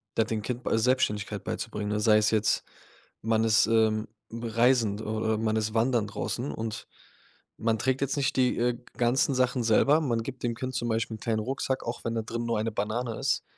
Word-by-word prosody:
da 115 - +3
dem 110 -1 -2
Kind 125 0 -4
bei - - +1
Selbstständigkeit 115 -3 0
beizubringen, 105 -1 -4
ne? 105 - 0
Sei 105 0 +5
es 110 0 +3
jetzt, 110 -1 +1 0.6
man 110 0 +1
ist, 115 +1 +5
ähm, 110 -1 +2 0.2
reisend 115 -2 +1
oder 110 0 -1
man 110 0 0
ist 110 0 -1
wandern 115 -1 +2
draußen 120 +5 -3
und 110 -1 -5 0.7
man 115 0 +1
trägt 130 +2 0
jetzt 140 +1 -1
nicht 140 0 0
die, 125 -1 +2
äh, 120 0 +1 0.2
ganzen 130 +3 +2
Sachen 130 -1 +1
selber. 140 +7 +4
Man 115 -6 0
gibt 130 0 -8
dem 115 -1 -1
Kind 130 +2 -4
zum 120 +1 -1
Beispiel 110 0 -1
'n - - -24
kleinen 110 -2 0
Rucksack, 130 +3 -2
auch 120 +1 -4
wenn 115 - -1
da 115 - 0
drin 115 +1 -4
nur 115 -2 0
eine 110 +1 -1
Banane 110 +3 -2
ist, - - 0
115 Hz, 205 wpm, -28 LUFS, 110-125 Hz, 0.7 s, Sei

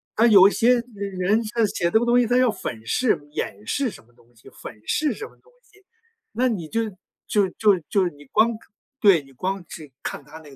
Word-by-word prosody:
他 230 +2 +4
有 200 -3 +8
一 - - +1
些 240 +1 +3
人 200 +2 0
他 230 -2 +2
写 175 - -3
这 220 - +4
个 240 - -1
东 240 +1 +4
西， 240 - +2
他 245 +2 +2
要 255 -3 +4
粉 115 - -7
饰、 245 - +1
掩 105 -7 -5
饰 275 -4 0
什 - - -14
么 120 - -28
东 120 0 -27
西， 110 - -20
粉 105 - -11
饰 305 -1 0
什 435 - -7
么 - - -21
东 485 - -27
西。 410 -2 -25 0.5
那 255 +1 +1
你 185 -9 -3
就 230 0 0 0.4
就 200 -3 +2
就 205 -3 +4
就 190 -3 +2
你 145 -1 -17
光 220 - +3
看 220 - -8 0.4
对， 195 - +5
你 135 - -19
光 185 +8 -4
是 150 -4 -10
看 - - -5
他 150 +3 -13
那 155 -2 -15
个 135 - -15
200 Hz, 250 characters per minute, -23 LUFS, 150-235 Hz, 0.5 s, 有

